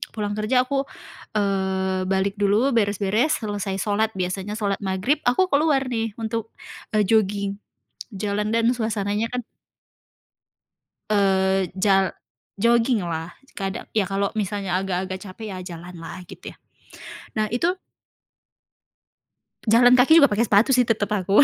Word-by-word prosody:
pulang 205 -1 -2
kerja 250 +4 +2
aku, 275 +1 0 0.6
eee, 190 -2 0
balik 195 +1 0
dulu, 215 +7 +3
beres-beres, 210 +6 +1
selesai 205 -2 -3
sholat 215 +1 +1
biasanya 190 +3 -3
sholat 200 -2 -1
maghrib 195 +10 0
aku 310 +10 +3
keluar 285 -2 +3
nih 225 -2 -2
untuk, 225 0 -3 0.4
eee, 210 - +4
jogging 200 -1 +1 0.6
jalan 210 +1 -1
dan 230 +1 +3
suasananya 220 -2 -1
kan 245 -2 -3 1.6
Eee, 190 -2 +2
jal 195 0 +2 0.5
jogging 235 -1 +3
lah. 165 0 -4 0.3
kada 195 +3 -3
ya 205 -4 +1
kalau 195 0 -1
misalnya 200 -2 -1
agak-agak 185 0 -3
capek 205 +2 -8
ya 185 - -6 0.2
jalan 175 +2 -10
lah 165 +2 -8
gitu - - -9
ya. - - -31 0.8
Nah 215 -1 0
itu 250 +8 +1 2.0
Jalan 240 +3 +6
kaki 275 +6 +6
juga 280 - +5
pakai 220 +2 +1
sepatu 215 +6 +4
sih 250 -2 +4
tetap 215 -2 0
aku, 200 +4 +4
205 Hz, 130 wpm, -23 LUFS, 190-230 Hz, 2.0 s, Jalan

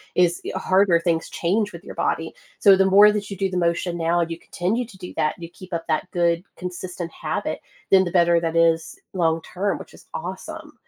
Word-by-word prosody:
is 175 -1 +3
e - - -3
harder, 185 -3 +3
things 165 -2 0
change 205 +3 0
with 170 +3 -10
your - - -9
body. 160 0 -1 0.3
So, 195 -1 +7
the 195 - +4
more 205 +2 +7
that 210 -1 -3
you 200 - -5
do 195 0 -1
the 180 - -3
motion 170 0 0
now 170 +1 +1
and 170 0 -2
you 165 - -5
continue 215 +10 -2
to 205 -4 -15
do 180 -1 -9
that, 155 - +1
you 170 -1 -8
keep 185 0 -13
up 165 0 -2
that 155 - -1
good, 170 0 +1
consistent 180 -1 -6
habit, - - -3 0.3
then 190 -1 +6
the 175 - -3
better 170 -1 +4
that 165 0 -2
is, 165 - +2 0.2
long-term, 175 +3 0
which - - -12
is - - -16
awesome. - - -7
175 Hz, 215 wpm, -23 LUFS, 170-190 Hz, 0.3 s, So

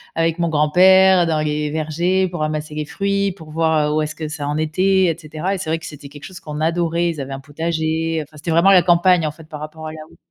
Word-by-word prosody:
avec 165 0 0
mon 170 - 0
grand-père 180 +4 +5
dans 160 -2 0
les 150 0 -2
vergers 170 +5 0
pour 175 -2 -6
ramasser 155 0 -3
les 150 -1 -3
fruits, 200 +4 -1
pour 160 -4 -13
voir, 160 -1 +1
heu, 150 - -1
où 155 - +1
est-ce 150 0 -4
que 155 -1 -6
ça 150 -2 -5
en 150 +1 -2
était 185 +5 +2
et 165 -1 0
cetera. 165 +4 -4
Et - - -4
c'est 160 -4 -4
vrai 165 - 0
que 165 - -11
c'était 145 -2 -11
quelque 145 0 -12
chose 185 -1 -10
qu'on 150 0 -7
adorait, 170 +1 0
ils 160 - -5
avaient 135 0 -6
un 135 - -6
potager, 160 +2 -2
enfin 150 +1 -18
c'était 160 +3 -4
vraiment 170 +4 +4
la 180 -3 +6
campagne 175 -1 +3
en 150 - -1
fait, 160 +1 -15
par 150 -2 -8
rapport 155 +1 -8
à - - -6
la - - -10
où - - -20
160 Hz, 270 wpm, -19 LUFS, 150-175 Hz, -, la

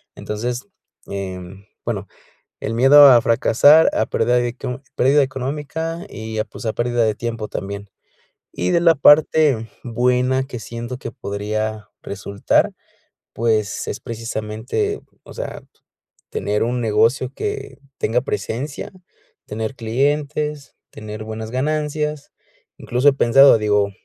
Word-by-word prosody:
Entonces, 120 - -4 0.4
em, 95 0 -7 0.2
bueno, 105 -4 -3 0.5
el 110 - -3
miedo 140 +4 +8
a 125 -2 +7
fracasar 145 +7 +5
a 110 - +2
pérdida 125 - +1
de 120 0 -1
co 125 +1 -5
pérdida 140 +3 +4
económica 150 +6 -4
y 110 0 -7
a 110 - 0
pues, - - -11
a 110 - 0
pérdida 120 0 0
de 110 - 0
tiempo 115 -1 -4
también. 100 +1 -6 0.6
Y 90 +1 -1
de 170 - +3
la 170 -1 +5
parte, 145 -4 +4 0.2
buena 125 +2 +1
que 130 -2 -7
siento 115 +3 -6
que 115 - -6
podría, 110 -1 -4
resultar, 100 +1 0 0.6
pues 110 -3 0
es - - -4
precisamente, 115 - -3 0.2
o - - -13
sea, - - -6 0.7
tener 105 +1 -1
un 120 +1 -1
negocio 115 +4 +2
que 415 - -4 0.2
tenga 120 +3 +1
presencia, 135 +3 -4 0.5
tener 110 +4 -4
clientes, 145 +4 -1 0.2
tener 110 0 -8
buenas 110 0 -6
ganancias. 150 +2 -2 0.5
Incluso 125 +4 +2
he - - +1
pensado, 135 0 +6
digo, 105 -1 +1
120 Hz, 125 wpm, -20 LUFS, 110-140 Hz, 0.7 s, miedo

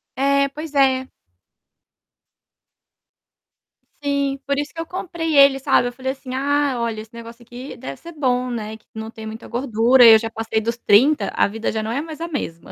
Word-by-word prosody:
É, 280 +1 +2
pois 300 +1 -8
é. 265 -1 +2 2.9
Sim, 280 -1 -1
por 280 0 0
isso 290 0 -3
que 330 - -9
eu 330 - -3
comprei 330 -3 -4
ele, 275 -1 +6
sabe. 245 -2 +2
Eu - - -10
falei 265 +1 -3
assim: 265 -1 -13
"Ah, 285 0 +1
olha, 225 -2 -2
esse 220 +1 -15
negócio 235 +1 -11
aqui 245 +3 -9
deve 135 0 -8
ser 340 0 -11
bom, 255 -4 0
né. 220 -2 -5
Que - - -33
não 220 0 -6
tem 220 -2 -10
muita 220 +1 -8
gordura". 245 0 +4
E 225 - +10
eu 220 - +7
já 225 0 -4
passei 225 -1 -2
dos 230 +2 -3
30, 250 +8 +3
a - - +3
vida 225 +2 -3
já 220 -1 -3
não 220 - -3
é 275 +4 -1
mais 320 0 -9
a 335 - -3
mesma. 170 - -5
260 Hz, 200 wpm, -21 LUFS, 225-280 Hz, 2.9 s, E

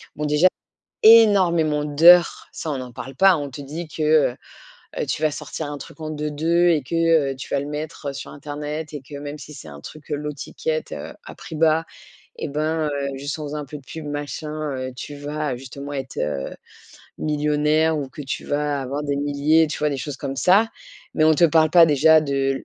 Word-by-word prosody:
Bon 150 - -4
déjà 150 +4 +4 0.6
énormément 185 -9 +6
d'heures, 170 +4 +5
ça 155 - -4
on 140 - -2
n'en 125 -1 -7
parle 135 +3 -8
pas. 195 +2 +6
On 145 -3 -4
te 135 +2 -10
dit 155 +4 -6
que, 155 - -4
heu, 150 -5 +3 0.6
heu, - - -1
tu - - -3
vas 155 -1 +2
sortir 150 0 -6
un 145 - -5
truc - - -12
en 155 -1 -5
2-2 155 +3 +1
et 155 -4 +3
que, 150 +6 -5 0.4
heu, - - -6
tu 130 - -8
vas 140 - +2
le 140 - -5
mettre, 150 0 -6
heu, 140 - -3
sur - - -8
internet 150 +2 -6
et 145 - -5
que 145 +2 -11
même 145 +1 -6
si 150 +1 -11
c'est 80 - -11
un 70 -1 -11
truc, 155 -2 -12
heu, 150 - +1
low 150 +1 -4
ticket, 480 - -3
heu, - - -7
à - - -10
prix 160 - -9
bas 160 +1 +3 0.6
et - - -2
ben, 155 +2 -1
heu, 140 -1 -2
juste 140 +3 -5
en 155 - -5
faisant 150 +1 -4
un 145 - -5
peu 150 +2 -8
de 140 - -12
pub 160 -2 -8
machin, 145 +1 -4
heu, 130 0 -5
tu 145 - -7
vas 145 -1 -3
justement 140 +3 -8
être, 135 -2 -5
heu, 75 -2 -2 0.7
millionnaire 150 +1 +1
ou 140 -2 -4
que 145 - -9
tu 135 - -5
vas 145 -1 -1
avoir 140 +3 -4
des 145 -1 -1
milliers, 145 +3 +2
tu 150 - -5
vois, 150 0 +1
des 140 - -2
choses 140 +2 -5
comme 135 0 -5
ça. 195 +10 +4 0.5
Mais 155 - +3
on 155 0 +5
te 170 - +4
parle 160 0 +4
pas 170 -2 +8
déjà 155 +1 +5
de 135 -2 -1
150 Hz, 225 wpm, -22 LUFS, 140-155 Hz, 0.7 s, pas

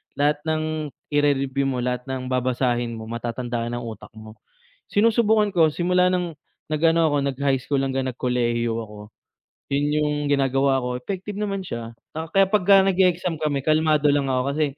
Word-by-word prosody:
lahat 145 +1 +2
ng 155 0 0 0.5
ire-review 140 -2 +1
mo, 125 -2 -2
lahat 125 +1 -3
ng 130 -1 -4
babasahin 125 -2 0
mo 110 - -7
matatandaan 120 +1 -4
ng 120 - -5
utak 115 -1 -8
mo. 110 0 -12 0.5
Sinusubukan 215 -1 +3
ko 170 -4 +4
simula 180 +1 +2
ng 175 -4 -2 0.3
nag-ano 165 +1 +3
ako, 145 - +1
nag-high 140 0 0
school 140 0 -1
hanggang 135 -1 -1
nagkolehiyo 120 -2 0
ako, 105 -2 -7 0.7
'yun 145 +2 +1
'yung 150 0 0
ginagawa 135 -1 +2
ko, 125 0 -3
effective 195 +8 -6
naman 195 -2 -2
siya, 115 -7 -6 0.2
ah, 160 - -4
kaya 195 +3 +3
pagka 195 -1 +5
nag-e-exam 180 -3 +1
kami 145 -3 -1
kalmado 155 -1 +3
lang 140 -1 +1
ako, 130 -1 +1
kasi, 155 +2 +1
140 Hz, 160 wpm, -23 LUFS, 125-165 Hz, 0.7 s, pagka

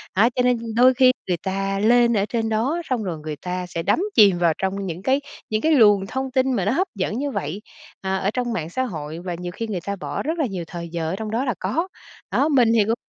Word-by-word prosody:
đó, 220 +5 +5
cho 250 - +2
nên 250 -1 +3 0.2
đôi 250 +2 +6
khi 255 0 +6 0.2
người 180 -2 0
ta 195 0 -1
lên 235 +2 +4
ở 200 - +2
trên 225 -1 -1
đó 255 +11 0
xong 250 -4 0
rồi 175 -5 -4
người 150 0 -5
ta 180 0 -3
sẽ 170 -1 -4
đắm 200 - +2 0.2
chìm 200 -5 +6
vào 170 -2 +3
trong 195 +1 -2
những 175 -1 -5
cái 265 +7 +1 0.3
những 215 0 0
cái 320 - +2
luồng 205 -8 +5
thông 265 +4 -3
tin 265 0 +2
mà 200 -7 0
nó 205 - +2
hấp 370 +9 +1
dẫn 205 +3 -2
như 285 +1 -2
vậy, 160 - -4 0.4
ờ, 190 0 -1
ở 195 +2 0
trong 245 -2 -1
mạng 165 -7 -3
xã 260 +9 -1
hội 160 -8 -5
và 175 0 -4
nhiều 180 0 -5
khi 230 - -4
người 190 -5 -3
ta 200 - -2
bỏ 185 - -4
rất 320 +4 -2
là 305 - +2
nhiều 190 -7 -4
thời 170 -1 -7
giờ 165 -1 -3
ở - - -2
trong 215 +1 -5
đó 240 +4 0
là 245 - 0
có. 325 - -1 0.4
Đó, 290 - +2
mình 250 -6 +4
thì 225 -2 +4
cũng 225 - +1
210 Hz, 270 wpm, -22 LUFS, 185-250 Hz, 0.4 s, đôi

